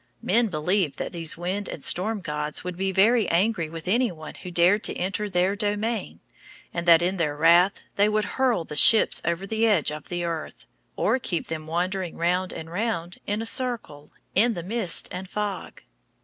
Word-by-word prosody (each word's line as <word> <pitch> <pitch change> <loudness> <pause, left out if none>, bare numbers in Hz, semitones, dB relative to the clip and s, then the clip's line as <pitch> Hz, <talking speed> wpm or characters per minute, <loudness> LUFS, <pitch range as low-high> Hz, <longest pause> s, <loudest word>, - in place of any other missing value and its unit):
Men 235 0 +2
believed 180 -1 0
that - - -4
these 165 -3 -1
wind 185 +4 -3
and 140 - -7
storm 210 +3 -1
gods 150 -2 -3
would 180 0 -5
be 190 +2 -1
very 215 +3 +3
angry 175 -2 +1
with 165 +1 -9
any 235 +3 +2
one 155 -2 -10
who 180 - -9
dared 180 +4 +3
to - - +1
enter 200 +3 -2
their 185 +1 +1
domain, 205 - -3 0.5
and 170 0 -4
that 170 0 +7
in 185 +2 0
their 150 -4 -1
wrath 175 +5 +4 0.2
they 205 +1 +4
would 215 0 0
hurl 250 -4 0
the 150 - -8
ships 220 +9 +6
over 170 +3 -2
the 220 +3 +1
edge 195 -9 +2
of 150 -1 -8
the 175 -1 -3
earth, 165 -2 -5 0.3
or 260 - +1
keep 175 -8 -3
them 160 -1 -5
wandering 180 +2 -2
round 180 +2 0
and 160 +1 -8
round 180 -3 -3
in 210 +2 -1
a - - -6
circle, 225 - -1 0.2
in 230 +3 +3
the 170 - -5
mist 200 -2 +1
and 185 +1 -7
fog. 205 -2 -5
185 Hz, 190 wpm, -25 LUFS, 170-210 Hz, 0.5 s, that